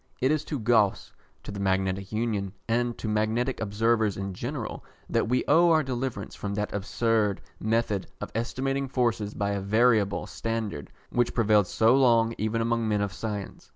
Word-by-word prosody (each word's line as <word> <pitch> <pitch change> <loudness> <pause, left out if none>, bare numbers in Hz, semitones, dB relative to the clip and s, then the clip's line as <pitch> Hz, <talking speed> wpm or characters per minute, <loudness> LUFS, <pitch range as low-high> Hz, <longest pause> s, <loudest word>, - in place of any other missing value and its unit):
It 130 +3 +2
is 155 -1 +1
to 150 - -3
Gauss, 110 -4 +2 0.3
to - - -7
the 100 - -6
Magnetic 95 0 0
Union, 105 -4 -1
and 120 +1 0
to - - -5
magnetic 110 +4 0
observers 110 0 +1
in 95 0 -4
general, 120 +4 -5 0.2
that - - 0
we 125 +1 +2
owe 170 +4 +5
our 160 -2 +4
deliverance 125 -5 -4
from 100 0 -4
that 105 0 -2
absurd 105 0 0 0.2
method 110 -2 0
of - - -6
estimating 135 +4 -1
forces 115 -5 -1
by 100 0 -1
a 100 -1 -2
variable 110 0 +2
standard 110 -10 -4 0.2
which 120 -1 +1
prevailed 105 -4 +4
so 115 +6 +4
long 115 -4 +4
even 110 +2 0
among 115 0 0
men 105 -1 +1
of 100 -1 -2
science. 105 -2 -6
110 Hz, 170 wpm, -27 LUFS, 100-120 Hz, 0.3 s, owe